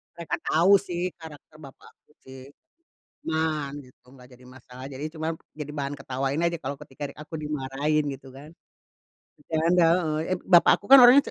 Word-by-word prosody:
Mereka 170 -1 -4
tau 170 +5 +3
sih 180 -2 -4
karakter 155 -1 -13
bapakku 140 0 -17
sih. 130 0 -12 0.9
Tenang 155 -3 -1
gitu, 125 -1 -22
gak 125 -1 -16
jadi 125 0 -17
masalah 125 0 -13
jadi 140 +1 -8
cuma, 160 0 -4 0.2
jadi 150 -1 -8
bahan 140 -1 -4
ketawain 135 +2 -3
aja 170 0 -1
kalo 140 +1 -5
ketika 140 +1 -7
di - - -15
aku 150 +2 -10
dimarahin 150 0 -2
gitu 135 0 -14
kan. 145 +5 -14 0.9
Bercanda, 165 +4 +1 0.2
heeh, 155 -1 -2 0.2
ep - - -11
bapak 175 -2 +6
aku 200 - -24
kan 275 - +11
orangnya 250 +3 +8
150 Hz, 165 wpm, -25 LUFS, 135-160 Hz, 0.9 s, kan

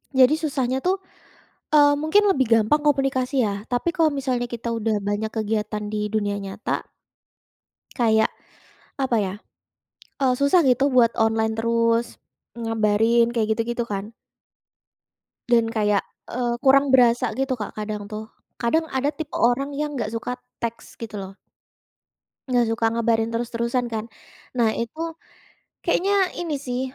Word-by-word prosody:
Jadi 265 +2 +5
susahnya 265 -4 -1
tuh, 375 +2 +1 0.7
eee, 290 -1 +6
mungkin 315 +8 +3
lebih 270 -10 +3
gampang 230 +7 +3
komunikasi 270 -3 +1
ya, 200 0 -3
tapi 250 +8 0
kalau 320 -2 +3
misalnya 255 -4 -2
kita 235 0 -3
udah 225 -1 0
banyak 205 +2 -2
kegiatan 215 -1 -2
di 210 0 -3
dunia 205 -1 0
nyata 195 +3 -3 1.1
kayak, 220 -3 +2 0.7
apa 265 -4 0
ya, 190 -2 -2 0.9
eee, 260 -2 +3
susah 280 +7 +4
gitu 270 +2 +3
buat 235 -2 +5
online 220 0 +1
terus, 230 +1 +1 0.3
ngabarin 225 +1 +2
kayak 220 -2 0
gitu-gitu 235 +1 -1
kan. 205 +2 -4 1.4
Dan 230 -2 +3
kayak, 210 -2 +2 0.3
eee, 240 -1 -1
kurang 275 0 +4
berasa 245 -2 +4
gitu 270 0 -1
Kak, 210 - -5
kadang 210 -1 -4
tuh. 215 +1 -7 0.3
Kadang 320 +8 +2
ada 265 +2 +1
tipe 310 0 -7
orang 270 +4 +1
yang 295 0 -3
nggak 220 -2 -3
suka 245 +2 -3 0.2
teks, 230 0 -5
gitu 215 -2 -6
loh. 195 -1 -7 1.2
Nggak 245 -1 +3
suka 225 0 -1
ngabarin 230 -1 +1
terus-terusan 235 +1 -1
kan. 220 0 -2 0.5
Nah 225 -2 +3
itu, 235 +7 -5 0.8
kayaknya 390 0 +2
ini 335 -3 -2
sih, 250 0 -2
235 Hz, 135 wpm, -23 LUFS, 220-270 Hz, 1.4 s, eee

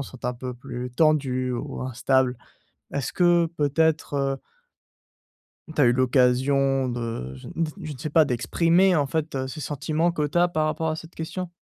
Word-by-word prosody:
sont 130 -3 -9
un 125 - 0
peu 125 +1 -6
plus 125 0 -6
tendues 130 -3 +2
ou 135 +3 -4
instables. 130 0 +1 0.6
Est-ce 140 -2 -2
que 175 -2 +4
peut-être, 155 +1 +1
heu 135 -1 -1 1.3
tu 150 - +2
as - - +7
eu 120 - +5
l'occasion 130 +1 +2
de, 115 - -4
je 65 - -11
ne 165 - -1
d 155 - -4
je 155 -2 -5
ne 135 - -10
sais 155 +2 -4
pas 160 +2 +5
d'exprimer 170 +9 +2
en 145 -4 +2
fait, 140 -3 -2
ce 155 +4 -7
sentiment 155 +4 -1
que 150 -3 0
tu 145 +4 -1
as 175 - +5
par 155 -3 0
rapport 160 +1 -1
à 155 - -2
cette 165 +1 -11
question? 180 +3 -4
140 Hz, 185 wpm, -25 LUFS, 125-160 Hz, 1.3 s, as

